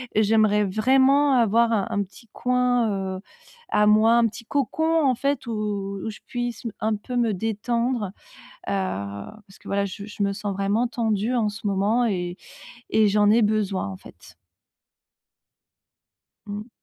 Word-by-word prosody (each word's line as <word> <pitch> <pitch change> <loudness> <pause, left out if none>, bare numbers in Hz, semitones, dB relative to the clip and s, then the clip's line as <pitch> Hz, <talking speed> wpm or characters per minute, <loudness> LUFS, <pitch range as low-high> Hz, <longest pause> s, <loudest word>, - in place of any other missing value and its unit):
j'aimerais 215 -1 +3
vraiment 265 +7 +3
avoir 230 0 +3
un 205 -4 +1
un 205 - 0
petit 200 +4 -16
coin, 240 -7 0
heu, - - -8 0.5
à 210 0 +3
moi, 215 +2 +5
un 235 -1 +4
petit 225 +2 -9
cocon, 320 +6 +1
en 260 -2 +3
fait, 275 0 -1
où 230 - -3 0.5
où - - -2
je 215 - -9
puisse 240 -1 -4
m 230 - -2
un 220 0 +1
peu 250 +5 -7
me 235 -3 +2
détendre, 225 +3 -1 0.6
heu, - - -1
parce 190 - -5
que, - - -13
voilà, 200 0 0
je 200 0 -7
je 210 -1 -5
me 200 - 0
sens 200 0 -4
vraiment 200 +5 0
tendue 225 -1 -1
en 230 -4 +1
ce 210 +1 -8
moment 205 +5 +1
et 180 -4 -2 0.5
et 215 -1 +4
j'en 205 0 +3
ai 225 +2 +5
besoin, 205 - 0
en 95 - -6
fait. - - -16 2.1
Mmh. 210 +2 -6
215 Hz, 160 wpm, -24 LUFS, 200-240 Hz, 2.1 s, moi